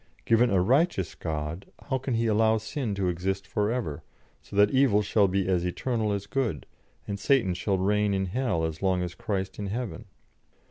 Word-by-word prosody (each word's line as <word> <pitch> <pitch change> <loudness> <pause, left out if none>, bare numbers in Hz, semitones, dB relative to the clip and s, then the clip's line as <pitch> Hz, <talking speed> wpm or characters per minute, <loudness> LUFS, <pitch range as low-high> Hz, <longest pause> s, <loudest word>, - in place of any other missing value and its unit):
Given 115 +2 +4
a 95 - +3
righteous 125 - +2
God, 80 +2 -4 0.2
how 130 -2 +1
can 130 -1 -2
He 115 +1 +1
allow 110 0 +3
sin 110 0 -3
to 95 -2 0
exist 95 +2 -2
for 105 0 -1
ever, 85 - -3 0.4
so - - -12
that 105 0 +5
evil 130 -6 +4
shall 100 0 +3
be 95 0 0
as 90 -2 +1
eternal 110 +4 -1
as 100 -1 -2
good, 105 - -2 0.4
and 100 -1 -4
Satan 125 -9 +2
shall 95 +2 -1
reign 105 +2 +2
in 95 -1 0
hell 95 -4 -1
as 80 -1 -3
long 95 -2 +1
as 90 -1 -4
Christ 95 -3 -3
in 100 - -3
heaven? 115 +1 -4
100 Hz, 190 wpm, -27 LUFS, 95-115 Hz, 0.4 s, that